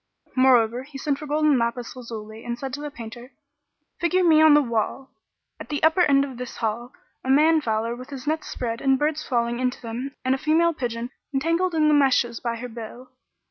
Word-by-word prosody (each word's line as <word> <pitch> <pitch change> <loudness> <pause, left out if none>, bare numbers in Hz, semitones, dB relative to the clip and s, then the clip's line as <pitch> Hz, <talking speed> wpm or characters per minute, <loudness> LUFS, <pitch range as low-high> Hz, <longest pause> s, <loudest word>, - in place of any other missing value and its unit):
Moreover 250 -2 +4
he 275 +1 -10
sent 280 0 -1
for 300 - -7
gold 305 +1 +1
and 290 -4 +4
lapis 235 +1 -2
lazuli[FN#40] 225 -3 -9
and 240 0 -4
said 265 +1 -6
to 290 - -4
the 295 - -4
painter, 240 0 -10 0.7
"Figure 365 +2 +2
me 315 -3 +6
on 310 -2 +7
the 295 - +6
wall, 235 +3 -2 0.5
at - - -9
the 295 -1 -3
upper 320 +3 +4
end 280 -4 +4
of 265 -3 -9
this 250 0 -7
hall, 235 +2 -3 0.3
a 260 - -5
man 310 +4 +5
fowler 225 -1 -1
with 255 +1 -10
his 270 -3 -8
nets 310 +1 -1
spread 230 -1 -4
and 270 -1 +3
birds 305 +2 -1
falling 235 -1 -1
into 255 0 -1
them 250 +4 -6
and 260 - +3
a 265 - -1
female 320 +3 +3
pigeon 240 -3 -4 0.2
entangled 335 +5 +1
in 310 -1 +3
the 305 - +4
meshes 260 -5 +3
by 235 -1 -2
her 240 +2 -6
bill." 240 +2 -10
260 Hz, 215 wpm, -24 LUFS, 235-300 Hz, 0.7 s, on